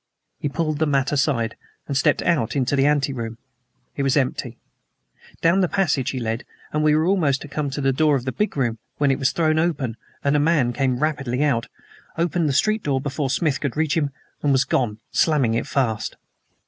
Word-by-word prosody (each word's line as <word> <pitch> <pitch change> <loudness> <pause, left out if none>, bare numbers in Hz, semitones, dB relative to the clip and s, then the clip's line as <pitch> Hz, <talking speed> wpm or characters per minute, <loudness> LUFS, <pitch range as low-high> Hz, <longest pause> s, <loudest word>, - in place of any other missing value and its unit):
He 145 - -2
pulled 155 0 -1
the 160 - +2
mat 140 -1 +1
aside 135 -6 +1 0.3
and 140 - -4
stepped 145 +1 +2
out 150 -9 +1
into 135 0 +1
the 135 +1 +3
anteroom. 135 -6 0 0.6
It - - -2
was 135 +1 +2
empty. 125 -3 -1 0.8
Down 170 +4 +4
the 185 - +3
passage 145 -9 +1
he 130 - -3
led, 115 +1 -2 0.3
and 150 - +1
we 150 0 +4
were 155 +1 +2
almost 155 -8 +1
come 150 -1 -2
to 140 +2 -4
the 135 -1 +2
door 150 +1 +3
of 130 -2 -2
the 130 - -1
big 210 -1 -2
room 120 -4 0 0.2
when 145 -2 +3
it 135 - 0
was 135 -1 +2
thrown 160 -1 +2
open 145 -9 -1 0.3
and 140 +1 +2
a - - +4
man 145 -5 +2
came 130 -2 0
rapidly 140 -3 0
out, 130 -6 +1 0.5
opened 170 -1 +1
the - - 0
street 215 +10 +2
door 140 -5 0
before 140 0 -2
Smith 145 +1 0
could 140 -2 -2
reach 155 -1 +1
him, 150 -4 +1 0.3
and 145 - +2
was 135 0 +4
gone, 110 -5 0
slamming 140 -8 +2
it 115 - -1
fast. 115 -6 -1
140 Hz, 205 wpm, -22 LUFS, 130-155 Hz, 0.8 s, Down